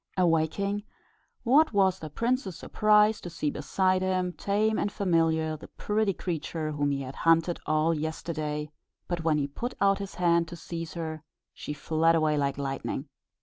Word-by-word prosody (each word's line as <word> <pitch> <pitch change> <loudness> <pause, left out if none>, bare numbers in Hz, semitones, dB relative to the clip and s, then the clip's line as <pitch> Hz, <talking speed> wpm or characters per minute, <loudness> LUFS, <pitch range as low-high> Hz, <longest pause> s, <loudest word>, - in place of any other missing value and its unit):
Awaking, 180 +4 +1 0.6
what 280 +4 +4
was 190 -2 +3
the 155 - -7
prince's 230 - -1
surprise 215 0 +3
to 175 - -6
see 155 -3 -2
beside 185 -1 +1
him, 185 -1 0
tame 215 +4 0
and 205 - 0
familiar, 165 -5 +1
the 150 - -11
pretty 210 -1 0
creature 160 -3 -3
whom 145 -1 0
he 140 -1 -1
had 130 0 -7
hunted 165 +1 +3
all 155 +2 +2
yesterday; 155 -1 -3 0.4
but 175 -2 -2
when 155 -2 +2
he 145 - +1
put 235 - -5
out 195 0 +3
his 200 -1 -6
hand 170 -1 +2
to 175 - -8
seize 165 -1 -6
her, 160 -2 -4 0.3
she - - -7
fled 165 +2 +2
away 155 -2 +2
like 140 -2 0
lightning. 135 0 -3
165 Hz, 165 wpm, -28 LUFS, 155-195 Hz, 0.6 s, what